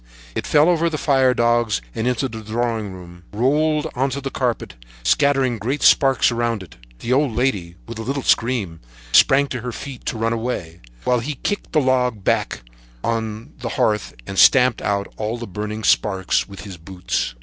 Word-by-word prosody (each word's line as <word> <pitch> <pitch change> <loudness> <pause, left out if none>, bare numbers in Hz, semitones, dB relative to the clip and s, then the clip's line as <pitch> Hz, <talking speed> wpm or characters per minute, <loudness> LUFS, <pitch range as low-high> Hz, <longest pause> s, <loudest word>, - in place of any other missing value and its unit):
It - - -3
fell 150 +2 +5
over 170 -1 +2
the 155 - -3
firedogs 120 -6 +2
into 125 +3 0
the 110 -2 -8
drawing 110 -1 -2
room 90 -1 -12
and 105 - -9
rolled 150 +4 +2
on 135 +1 0
to 135 +2 -3
the 135 -1 -5
carpet, 125 -3 -2 0.3
scattering 135 - +2
great 130 +8 -2
sparks 135 -2 +5
around 115 -3 -1
it. 75 -9 -15 0.3
The 120 - 0
old 135 -4 +1
lady, 100 -10 -1
with 115 -1 -7
a - - -3
little 135 +3 -3
scream, 110 -9 +1 0.3
sprang 135 - +6
to 125 - -4
her 125 +1 -4
feet 130 +1 -8
to - - -2
run 115 +1 0
away, 105 -8 -4 0.2
while 125 -1 +2
he 140 +5 -4
kicked 205 +9 -3
the 155 - +4
log 125 -5 +1
back - - 0 0.4
on 115 +4 -3
to - - -20
the 120 - -3
hearth 105 -1 0
and 95 - -3
stamped 125 -3 +5
out 100 -1 0
all 110 +2 -2
the 120 - -6
burning 105 +2 -5
sparks 95 -3 +1
with 100 - -9
his 95 -3 -9
boots. 90 -7 -3
120 Hz, 185 wpm, -21 LUFS, 105-135 Hz, 0.4 s, sprang